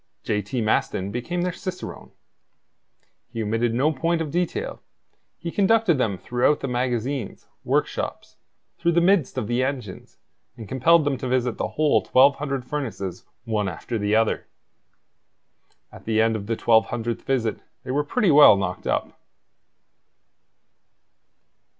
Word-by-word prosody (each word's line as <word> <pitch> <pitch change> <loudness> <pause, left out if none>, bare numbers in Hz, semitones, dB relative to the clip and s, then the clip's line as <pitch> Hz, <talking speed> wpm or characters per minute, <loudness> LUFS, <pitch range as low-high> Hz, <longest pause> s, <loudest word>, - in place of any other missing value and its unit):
J. 105 -1 0
T. 110 +5 -3
Maston 100 -3 0
became 175 +10 -3
their 180 - 0
cicerone. 185 +1 -7 1.2
He 115 -2 -4
omitted 115 +2 0
no 140 +6 +2
point 165 +4 0
of 155 -3 -3
detail; 175 +1 -2 0.6
he 170 - -5
conducted 205 -5 +3
them 105 -6 0
throughout 125 +8 +1
the - - -2
magazines, 125 -1 -2 0.2
workshops, - - -2 0.4
through 170 0 +1
the 170 - +4
midst 170 -7 +2
of 125 - -1
the 120 +3 0
engines, 125 -8 -5 0.4
and 110 -3 -9
compelled 155 +6 +3
them 140 -3 -1
to 130 - -4
visit 125 -2 0
the - - 0
whole 155 -1 +3
1,200 135 0 +2
furnaces 110 -11 -5 0.2
one 105 -3 -1
after 110 +6 -5
the 105 +1 +1
other. 110 0 +1 1.4
At - - -14
the 110 -1 +1
end 110 0 +3
of 100 -2 -5
the 115 - 0
twelve 110 0 +3
hundredth 120 -1 -3
visit 120 -5 -1 0.2
they - - -5
were 145 +3 +1
pretty 195 +4 +1
well 145 -8 +8
knocked 90 -2 -4
up. - - -2
125 Hz, 145 wpm, -24 LUFS, 110-150 Hz, 1.4 s, well